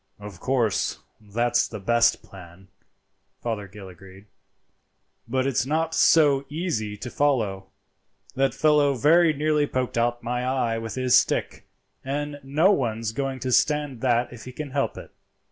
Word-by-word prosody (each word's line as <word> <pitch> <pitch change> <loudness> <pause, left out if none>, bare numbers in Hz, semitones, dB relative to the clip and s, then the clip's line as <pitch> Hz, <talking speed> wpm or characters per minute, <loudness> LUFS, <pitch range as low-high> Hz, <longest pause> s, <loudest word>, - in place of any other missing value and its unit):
"Of 105 -1 -10
course, 120 -8 0 0.2
that's 120 +4 0
the 110 - -8
best 115 +4 +2
plan," 90 0 -14 0.7
Fothergill 105 -3 -5
agreed, 95 +2 -14 1.0
"but 130 +2 0
it's 135 -3 +1
not 160 +4 -1
so 145 -5 +4
easy 140 - -3
to 125 +4 -7
follow. 110 -10 0 0.7
That 135 -1 0
fellow 150 -2 +3
very 160 +6 +4
nearly 150 0 +1
poked 125 -3 -2
out 120 +1 -1
my 125 +1 -2
eye 125 -3 -1
with 115 0 -6
his 130 -1 +2
stick, - - 0 0.4
and 145 +2 -4
no 150 +8 +2
one's 115 - -1
going 135 +2 -3
to 130 - -2
stand 145 -2 +1
that 120 -1 +1
if 120 - -11
he 130 - -8
can 145 +2 -7
help 140 0 -1
it." - - -10
125 Hz, 145 wpm, -24 LUFS, 110-145 Hz, 1.0 s, so